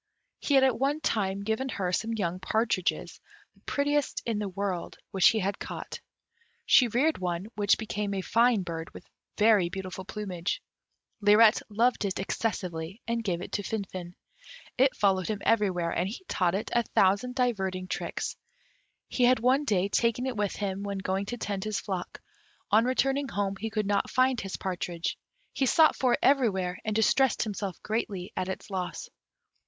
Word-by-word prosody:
He 285 - +1
had 265 - +6
at 255 -4 +2
one 280 +3 +1
time 200 -8 -1
given 220 +5 -1
her 190 -6 -2
some 225 +4 0
young 185 -5 -2
partridges, 215 -1 -1 0.3
the - - -27
prettiest 290 0 0
in 225 -3 -1
the 205 -2 -2
world, 190 -2 -3
which 190 -2 +6
he 225 - 0
had 200 -1 -1
caught. - - -6 0.7
She 250 - +6
reared 270 +8 +1
one, 175 0 -2
which 205 -1 +3
became 210 -2 -3
a 190 - -1
fine 230 -2 +3
bird, 165 -2 -6
with - - -10 0.3
very 210 -5 +4
beautiful 190 0 -6
plumage; 185 -4 -4 0.6
Lirette 210 +2 +6
loved 230 +4 +2
it 195 -2 -2
excessively, 185 -3 -3
and 230 0 -1
gave 180 -4 -2
it - - -8
to - - -1
Finfin. 185 -4 -5 0.6
It 265 +1 +3
followed 190 -3 +2
him 215 - -1
everywhere, 185 -7 +2
and 180 +2 -1
he 245 - -8
taught 180 -1 +1
it 205 - -3
a 240 - +4
thousand 215 +3 +2
diverting 190 -8 -1
tricks. - - -3 0.7
He 250 - +2
had 250 0 +4
one 260 +5 +3
day 195 -6 +2
taken 235 +4 +1
it 260 -2 -2
with 205 -2 -1
him 195 -1 -3
when 200 -1 -3
going 190 +1 -2
to 240 - -4
tend 200 -4 -3
his 215 -1 -2
flock; 185 -3 -5 0.5
on 220 +3 +5
returning 270 +2 +1
home 200 -4 -2
he 225 +3 -4
could 215 -1 -1
not 200 0 +1
find 255 -1 +2
his 195 - -5
partridge; 175 -2 -3 0.3
he 265 - +1
sought 315 +4 +5
for 255 -2 +2
it - - +1
everywhere, 195 -10 +2
and 215 -1 -2
distressed 260 +4 +3
himself 200 -4 -4
greatly 200 -4 -3
at 185 - -2
its 190 - -6
loss. 185 -2 -4
205 Hz, 175 wpm, -28 LUFS, 190-235 Hz, 0.7 s, had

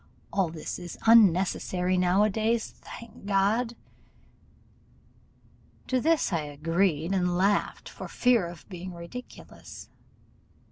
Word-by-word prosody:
All 190 -4 +1
this 160 -1 -6
is 175 -1 -8
unnecessary 185 -4 +4
now 180 +2 +3
a 215 - +3
days, 225 +2 0
thank 225 -3 -12
God!' 210 +5 +1 2.1
To 255 -1 +1
this 320 - +2
I 165 - +1
agreed, 165 +3 0
and 180 -2 +1
laughed 200 +2 0
for - - -8
fear 240 -8 +2
of 170 0 -11
being 180 -1 -8
ridiculous. 170 +9 -10
190 Hz, 110 wpm, -27 LUFS, 175-220 Hz, 2.1 s, unnecessary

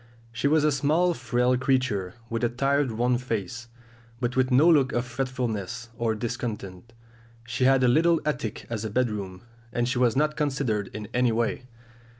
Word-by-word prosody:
She 115 +4 -1
was 155 +1 +3
a 150 - +3
small 155 +6 +2
frail 125 -2 +1
creature, 130 -9 0
with 115 0 -3
a 120 - +3
tired 135 +2 +1
worn 120 +2 +1
face, 115 -1 -4 0.5
but 125 -1 -2
with 130 -1 +2
no 135 +6 +5
look 145 -6 +4
of 120 +1 0
fretfulness 120 -3 -3
or 115 -1 0
discontent. 115 -3 -5 0.5
She 125 +2 -1
had 135 0 +4
a - - +5
little 165 +6 +4
attic 135 -8 -3
as 115 -2 -4
a 110 - -3
bedroom, 105 -5 -2 0.3
and 120 0 0
she 125 0 -1
was 120 -3 +3
not 150 +2 +1
considered 135 -9 -1
in 105 -1 -5
any 125 -1 +2
way. 115 +2 -1
125 Hz, 170 wpm, -26 LUFS, 115-135 Hz, 0.5 s, no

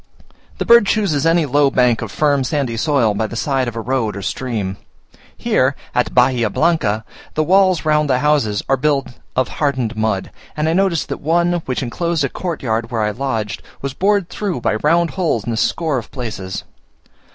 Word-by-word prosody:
The - - -2
bird 235 -3 +6
chooses 165 -9 +1
any 165 -1 +3
low 145 +1 +3
bank 125 -3 +2
of 110 -3 -5
firm 145 -3 +2
sandy 130 -3 -1
soil 125 -4 +2
by 110 +2 -1
the 115 - -8
side 130 +1 0
of 120 - -5
a 115 - -3
road 115 -4 -1
or 100 - -6
stream. 105 -4 -3 0.6
Here - - +1 0.2
(at - - 0
Bahia 125 -3 +3
Blanca) 115 -9 +1 0.3
the 155 - +2
walls 185 0 +3
round 150 -1 +2
the 130 - +3
houses 135 -8 +1
are 135 - +2
built 140 0 0 0.3
of 130 -1 +2
hardened 130 -6 -1
mud, 110 -3 -1 0.3
and 150 +1 0
I 160 - +2
noticed 185 -4 +1
that - - -4
one, 170 +3 +2
which 130 +1 -1
enclosed 165 +6 -1
a 135 - 0
courtyard 120 -11 -3
where 115 -3 -1
I 105 - +1
lodged, 115 -3 -3 0.2
was 140 -1 -3
bored 200 +3 +1
through 190 -11 -3
by - - +1
round 170 +2 +2
holes 160 - -1
in 120 - -2
a - - -1
score 150 +4 0
of 110 - -11
places. 105 -7 -5
135 Hz, 190 wpm, -18 LUFS, 115-160 Hz, 0.6 s, bird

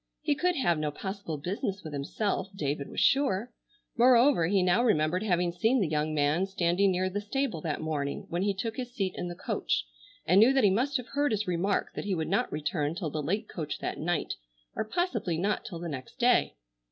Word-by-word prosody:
He 300 -1 +2
could 355 +5 +1
have 175 - +1
no 155 -1 0
possible 190 0 -5
business 190 +5 -3
with 155 -2 -7
himself, 190 +8 -2
David 145 -4 -2
was - - -4
sure; 250 -5 +2 0.4
moreover 245 - +5
he 195 0 +2
now 180 +6 +3
remembered 180 -5 +2
having 180 -4 +1
seen 225 +9 +2
the 195 - +1
young 155 0 0
man 150 +6 +2
standing 190 +1 +2
near 185 0 +1
the 200 +2 -3
stable 215 - -2
that 155 -2 -3
morning 145 -3 -3
when 175 +1 -2
he 200 0 +1
took 220 +3 -4
his 250 -2 -4
seat 195 -6 -2
in 175 - -4
the 175 - -6
coach, - - -1 0.4
and 180 +4 +5
knew 235 +5 +7
that 270 -2 +3
he 200 - +5
must 265 +8 +1
have 250 -1 -8
heard 290 0 +1
his 210 -1 0
remark 180 +2 0
that - - -5
he 200 -2 0
would 160 -2 -2
not - - +1
return 150 0 -1
till 170 -5 -3
the 155 - -2
late 200 +9 -1
coach 155 -4 -4
that - - -4
night, 175 +1 -1 0.4
or - - 0
possibly 225 - -1
not 200 +5 0
till 175 - -6
the 170 +1 -5
next 130 -5 -7
day. - - +3
185 Hz, 215 wpm, -29 LUFS, 160-220 Hz, 0.4 s, knew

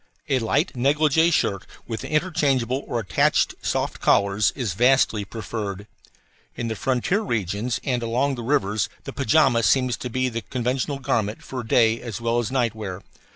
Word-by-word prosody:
A 135 -2 +2
light 140 +9 0
negligee 150 +5 +3
shirt 100 - 0 0.2
with 115 -2 -5
interchangeable 140 -6 0
or 120 - -1
attached 105 - +2
soft - - -2
collars 100 +1 +3
is 120 -9 -2
vastly 120 -1 +3
preferable. 105 -2 -5 0.7
In 120 -1 -3
the 110 - -2
frontier 135 - 0
regions 110 - -2
and 125 -4 -1
along 125 +5 0
the 120 - -5
rivers 110 -5 0
the - - -7
pajama 120 -1 +3
seems 125 +4 +2
to 125 - -5
be 130 +2 0
the 115 -2 -3
conventional 130 +5 -2
garment 110 -5 -1
for 130 -1 -5
day 115 0 +3
as 115 -2 -6
well 115 0 0
as 115 -3 -2
night 125 -4 0
wear. 100 -3 -6
120 Hz, 160 wpm, -23 LUFS, 110-135 Hz, 0.7 s, negligee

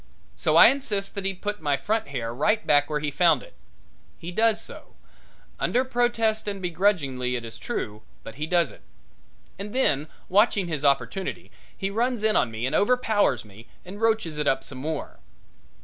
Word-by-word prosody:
So - - +1
I - - +10
insist 215 -8 -1
that 200 -2 -5
he 195 0 0
put 205 +1 -4
my 145 -2 +1
front 220 +11 -1
hair 120 -5 -4
right 210 - +1
back 145 -1 +3
where 150 -1 -1
he 150 -1 -2
found 175 +4 +3
it. - - -15 0.6
He 170 +1 -7
does 220 +3 +2
so, - - -10 0.6
under 255 +2 +1
protest 235 -4 0
and 200 -1 -3
begrudgingly, 165 -9 0
it 120 -1 -4
is 115 0 -9
true, 105 -1 -4 0.2
but 115 - -9
he 150 +4 -4
does 170 -4 +2
it. - - -16 0.8
And 205 +4 -6
then, 150 - +2 0.2
watching 200 -1 +3
his 155 -4 -3
opportunity, 140 - 0 0.3
he 195 0 -2
runs 235 +1 0
in 220 -1 +3
on 125 - +3
me 115 +2 -4
and 130 - -2
overpowers 205 - +2
me 105 +3 -15 0.2
and 200 +4 -9
roaches 220 -9 +1
it 150 - -1
up 135 0 +1
some 130 -1 -8
more. 155 +2 -5
180 Hz, 180 wpm, -25 LUFS, 140-215 Hz, 0.8 s, I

